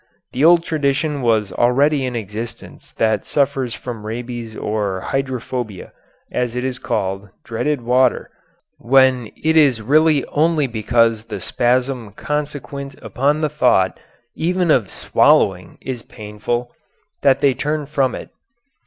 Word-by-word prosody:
The 130 - -1
old 170 +1 +6
tradition 145 -1 -1
was 110 -5 +1
already 135 +3 +2
in 125 - -4
existence 110 +1 -7
that 110 -2 +1
sufferers 135 -4 0
from 120 -4 -7
rabies 115 0 -6
or 100 -3 -2
hydrophobia, 125 -6 -4 0.4
as 125 -1 -2
it 125 - -2
is 130 -1 -3
called, 95 +1 -3
dreaded 130 +4 -2
water, 125 +2 +2 0.5
when 130 -2 +3
it 160 +1 +2
is 140 -7 +5
really 150 +3 +3
only 155 0 +2
because 115 -1 +1
the 105 -3 -6
spasm 125 +1 0
consequent 145 +1 -4
upon 145 +4 0
the 155 - +1
thought 125 -10 +2 0.3
even 180 0 0
of 115 -9 +2
swallowing 90 -2 +2
is 125 -2 -5
painful 110 +3 -5 0.5
that 135 -1 +4
they 140 -2 +4
turn 150 +3 -2
from 135 -4 0
it. - - -9
125 Hz, 130 wpm, -19 LUFS, 115-145 Hz, 0.5 s, old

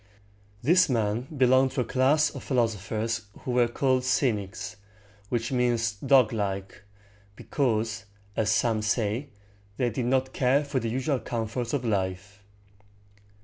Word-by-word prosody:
This 175 +6 +4
man 115 0 0
belonged 130 0 +4
to 130 - 0
a - - -2
class 140 +4 +2
of - - -8
philosophers 115 -2 -1
who 125 - -4
were 120 -1 +3
called 130 +1 +1
"cynics," 105 -7 -1 0.5
which 120 0 -1
means 120 -3 +1
"doglike," 105 -8 +1 0.5
because, 115 -5 -1 0.3
as 110 -2 +1
some 110 0 +1
say, 110 +4 -1 0.5
they 120 -2 0
did 120 +3 -2
not 130 +1 +1
care 135 +3 +2
for 140 -2 -1
the 115 -1 -3
usual 130 +3 -1
comforts 115 +1 -3
of 135 -3 -1
life. 100 -1 -2
120 Hz, 130 wpm, -27 LUFS, 110-130 Hz, 0.5 s, This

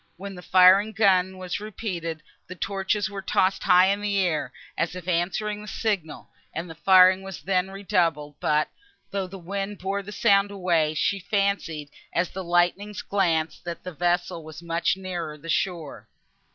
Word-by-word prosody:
When 200 +2 -7
the 180 - -9
firing 185 +3 +6
of 220 - -13
guns 190 -3 +3
was 185 0 -4
repeated, 180 -7 -5 0.2
the 185 - -8
torches 195 +2 -1
were 200 0 -6
tossed 190 0 +1
high 180 +1 +6
in 200 +1 0
the 205 -1 0
air, 175 -5 0 0.2
as 170 +2 -1
if 180 -1 -8
answering 190 +4 -1
the 210 - -10
signal, 200 -9 -3 0.2
and 165 +3 -3
the 165 - -8
firing 185 +2 +6
was 195 -1 -8
then 185 0 +1
redoubled; 170 -6 0
but, 150 0 +2 0.4
though 195 -2 -2
the 195 +1 -9
wind 195 +3 -4
bore 195 +2 -2
the 200 +1 -9
sound 200 -2 +3
away, 170 -6 +1
she 200 +5 +1
fancied, 190 -7 -1 0.2
as 175 +1 0
the 190 - -5
lightnings 175 +4 +1
glanced, 165 -5 0
that 170 -1 -6
the 180 - -6
vessel 175 0 0
was 155 +2 -10
much 170 +2 0
nearer 175 -5 -5
the 165 +3 -11
shore. 165 -3 -2
185 Hz, 175 wpm, -25 LUFS, 170-200 Hz, 0.4 s, firing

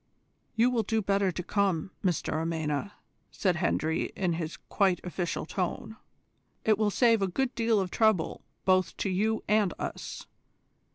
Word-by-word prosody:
"You 235 +3 +4
will 240 -2 +2
do 220 +1 0
better 195 -1 +2
to 180 - -5
come, 190 -3 0
Mr 180 -5 0
Amena," 160 +3 -2 0.4
said 185 -3 0
Hendry, 160 -2 0
in 180 -3 0
his 165 -1 -4
quiet 190 -4 +1
official 180 -2 -3
tone; 185 +5 -3 0.7
"it 215 -1 +3
will 215 -1 +3
save 230 0 +4
a 195 - +2
good 255 +8 -1
deal 230 -2 +2
of 185 -2 -2
trouble 220 -7 +2 0.2
both 185 -1 +2
to 195 - -1
you 215 +4 0
and 210 -4 +2
us. - - -5
195 Hz, 155 wpm, -29 LUFS, 175-220 Hz, 0.7 s, You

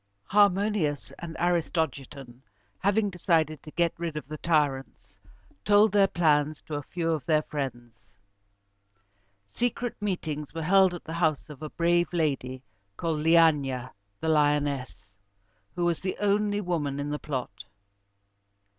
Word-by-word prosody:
Harmodius 200 -6 +2
and 165 -1 -7
Aristogiton, 150 -7 -2 0.4
having 205 +1 +1
decided 160 -5 +1
to - - -11
get 170 +2 0
rid 165 -3 -3
of 150 - -6
the 155 0 -7
tyrants, 145 -5 -1 0.4
told 205 +1 +5
their 200 -1 +5
plans 155 -4 +2
to 155 - -9
a 145 - -2
few 165 +3 -2
of 155 -4 -1
their 155 -2 +3
friends. 125 -6 -5 1.5
Secret 245 - -2
meetings 160 -7 -3
were 165 - -3
held 190 +1 +4
at 175 - -9
the 160 - -7
house 155 -3 0
of 145 - -12
a 155 - -5
brave 175 +1 +1
lady 135 -6 -1 0.3
called 165 -2 -1
Le 155 +2 +1
æ´na 140 -6 +3 0.3
("the 160 - -1
lioness"), 145 -8 0 0.6
who 175 - 0
was 170 -2 +1
the 185 - -3
only 205 0 +1
woman 155 -7 -2
in 145 +1 -3
the 150 - -3
plot. 125 -8 -5
160 Hz, 140 wpm, -27 LUFS, 145-175 Hz, 1.5 s, told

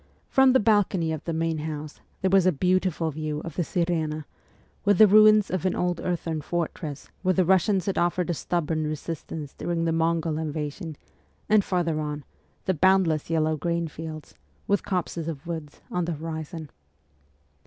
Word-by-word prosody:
From 265 -1 +5
the 260 - +5
balcony 200 -6 +2
of 155 - -5
the 170 - -2
main 165 -1 -1
house 150 -1 -6 0.2
there 190 - +1
was 190 -2 +5
a - - +6
beautiful 180 0 +1
view 155 0 -3
of 165 -2 -7
the - - 0
Sir6na, 160 -3 -1 0.6
with 205 -2 +3
the 215 - +9
ruins 215 0 +6
of 185 -1 -1
an 185 - +1
old 180 -1 0
earthern 165 -3 -2
fortress 155 -2 -4
where 185 -1 +2
the 185 - +3
Kussians 190 +1 +3
had 195 - 0
offered 175 0 +1
a - - +1
stubborn 160 -1 -1
resistance 155 -1 -5
during 170 -1 -2
the 165 - +1
Mongol 165 -1 0
invasion, 155 +1 -4 0.5
and 215 -1 +5
farther 170 -5 0
on, 150 -1 -4 0.4
the 190 - +2
boundless 180 -3 +3
yellow 155 -1 +1
grain 170 +2 -1
fields, 155 0 -8 0.3
with 200 0 +2
copses 175 -3 -2
of 160 -1 -5
woods 160 -3 -6
on 180 -1 0
the 170 - -2
horizon. 160 0 -6
165 Hz, 170 wpm, -26 LUFS, 155-185 Hz, 0.6 s, the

